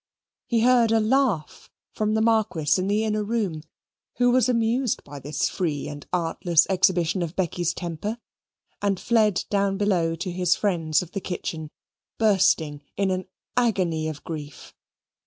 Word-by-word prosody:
He 230 -2 +1
heard 240 -2 +4
a 225 - +4
laugh 220 - 0 0.2
from 215 0 -1
the 220 - +2
Marquis 210 -9 +2
in 185 - -1
the 210 +2 +1
inner 215 -1 0
room 205 -8 -2 0.5
(who 245 0 +3
was 255 -1 +3
amused 235 +1 +1
by 145 0 -9
this 145 +2 -1
free 155 -7 -2
and 145 -1 -8
artless 170 -1 +2
exhibition 185 -1 +2
of 170 0 -4
Becky's 175 -2 0
temper) 175 +6 -4 0.6
and 200 -2 0
fled 215 -5 +2
down 200 -1 +1
below 180 -5 +1
to 180 +3 -4
his 180 0 +2
friends 165 -6 +1
of 175 - -13
the 195 - -4
kitchen, 160 -4 -5 0.5
bursting 180 -8 +2 0.2
in 195 -1 +1
an 185 0 -3 0.3
agony 185 -10 +1
of 155 -2 -6
grief. 150 -3 -8
190 Hz, 155 wpm, -24 LUFS, 165-220 Hz, 0.6 s, heard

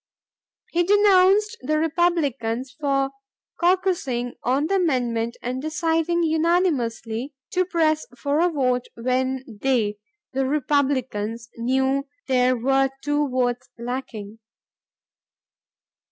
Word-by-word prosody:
He 345 - +2
denounced 405 +2 +4
the 305 +4 0
Republicans 295 -7 0
for 275 -2 +1 0.5
caucusing 345 -10 +1
on 265 +4 +1
the 390 +4 +1
amendment 240 -9 0
and 255 +2 -3
deciding 325 +2 0
unanimously 295 -7 0 0.2
to 370 0 +1
press 320 -3 +1
for 285 +4 0
a 350 +1 +4
vote, 255 -5 0
when 255 +2 -1
they 220 -2 -1 0.3
the 265 0 0
Republicans] 260 -6 -1
knew 265 +3 +1 0.2
there 255 -1 +3
were 270 +3 +2
two 290 0 +1
votes 250 0 -1
lacking. 235 -3 -6
270 Hz, 100 wpm, -23 LUFS, 245-325 Hz, 0.5 s, denounced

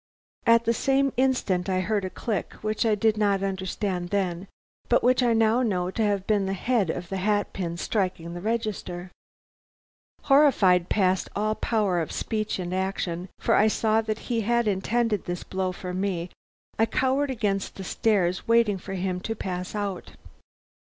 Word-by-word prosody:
At 230 0 +5
the 230 - +3
same 275 +2 +1
instant 235 -9 +1
I 185 -1 +1
heard 205 +1 0
a 185 - -2
click, 210 -1 -3
which 215 +1 0
I 215 - +3
did 215 +1 +2
not 200 -2 +2
understand 190 -1 -2
then, 185 -2 -1 0.4
but 245 - +3
which 255 +1 +4
I 240 -2 +3
now 225 +2 +3
know 185 -6 0
to 225 - -3
have 200 -3 +1
been 205 -3 +1
the 195 - -1
head 220 -3 +1
of 175 +2 -4
the 195 - -3
hat 205 +2 0
pin 170 -3 -3
striking 180 -4 -2
the 175 - -6
register. 205 -5 -3 1.1
"Horrified 220 - +4
past 190 -3 +1
all 215 +1 +1
power 210 -6 0
of 160 - -4
speech 215 -1 -2
and 180 -1 -4
action, 185 -1 -2
for - - +1
I 215 - +5
saw 220 0 +2
that 215 -1 -3
he 230 -1 +1
had 235 +1 +1
intended 210 +2 0
this 175 0 -4
blow 185 -1 -2
for 180 0 -6
me, 185 -2 -2 0.5
I 225 - +4
cowered 265 +4 +1
against 205 -6 -1
the 195 - -7
stairs, 185 -2 0
waiting 230 -4 +3
for 195 +1 -6
him 185 -1 -2
to 225 +4 -4
pass 185 -1 -5
out. 200 -3 -4
200 Hz, 175 wpm, -26 LUFS, 185-225 Hz, 1.1 s, At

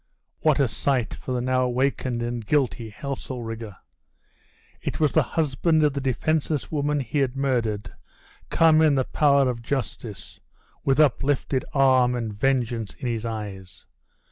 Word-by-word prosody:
What 155 -2 +2
a 140 - +4
sight 125 0 0
for - - -7
the 125 -1 0
now 130 +1 +1
awakened 125 -1 -1
and 120 -1 -3
guilty 125 -3 0
Heselrigge! 115 -3 -6 1.1
It - - -4
was 150 -3 +3
the 160 - +5
husband 155 +3 +1
of 150 -2 +3
the 140 - -3
defenseless 145 +3 -1
woman 145 -1 0
he 135 +4 -2
had 135 -2 0
murdered 120 -6 -1 0.6
come 160 -1 +5
in 155 -3 +4
the 130 -2 +1
power 140 -2 +3
of 120 -2 -2
justice, 115 -5 -5 0.4
with 135 +1 +2
uplifted 135 -2 +2
arm 130 -2 +4
and 115 -3 -3
vengeance 120 -2 -1
in 125 - -4
his 115 -1 -2
eyes? 95 -5 -7
130 Hz, 145 wpm, -24 LUFS, 115-140 Hz, 1.1 s, the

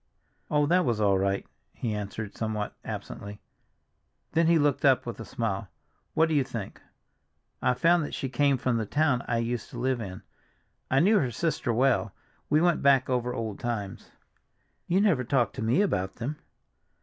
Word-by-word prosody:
"Oh, 150 -1 +3
that 180 +4 +3
was 120 -7 0
all 100 -2 +3
right!" 100 0 0 0.3
he 115 -4 -3
answered 105 0 -5
somewhat 110 -2 -3
absently. 100 0 -7 0.9
Then 165 +1 +3
he 170 0 +5
looked 145 -3 +1
up - - +4
with - - -6
a - - -6
smile. - - -3 0.5
"What 160 - +4
do 160 - -1
you 145 -3 +3
think? 115 -6 -7 0.8
I 125 - +2
found 170 +3 +3
that - - -5
she 135 - -3
came 140 +2 +2
from 125 -1 0
the 110 -2 -2
town 145 -3 +2
I 120 - 0
used 115 +1 -2
to - - -9
live 130 -1 0
in. 95 -3 -7 0.7
I 135 +1 +4
knew 205 +5 +5
her 130 - 0
sister 145 0 -1
well. 120 -3 +2 0.4
We 150 +2 +4
went 175 -1 +3
back 135 -2 +4
over 125 -1 0
old 110 -4 -4
times." 105 -5 -4 0.8
"You 185 +3 +3
never 175 -12 +3
talk 120 -3 +1
to - - -6
me 115 - +2
about 95 - -1
them." 140 +6 -4
125 Hz, 180 wpm, -28 LUFS, 110-150 Hz, 0.9 s, he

